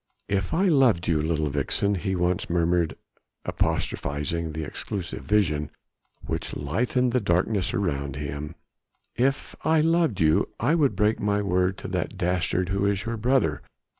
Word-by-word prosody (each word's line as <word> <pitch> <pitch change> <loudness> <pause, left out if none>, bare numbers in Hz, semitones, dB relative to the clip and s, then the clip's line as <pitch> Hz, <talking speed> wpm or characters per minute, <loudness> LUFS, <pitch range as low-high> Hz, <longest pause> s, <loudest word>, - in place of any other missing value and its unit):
"If 95 -2 -1
I 190 +4 +2
loved 130 - +4
you, 80 -3 +2
little 80 -2 0
vixen," 75 +8 0
he 95 0 -1
once 90 0 0
murmured 85 -1 +1 0.5
apostrophizing 75 +3 -1
the 80 +1 -3
elusive 85 +4 -5
vision 75 -8 +1 0.6
which - - -4
lightened 125 - 0
the 125 - +2
darkness 95 0 +1
around 70 -8 -2
him, 75 +2 -5 0.6
"if 135 +3 0
I 160 0 +3
loved 165 - +2
you, 80 0 +3
I 130 +7 +2
would 150 -5 +2
break 105 +1 +2
my 105 0 +1
word 90 0 +1
to - - -7
that 90 +2 -3
dastard 90 0 0
who 100 +1 0
is 100 +2 0
your 115 0 -2
brother 120 - +1
90 Hz, 150 wpm, -26 LUFS, 80-110 Hz, 0.6 s, loved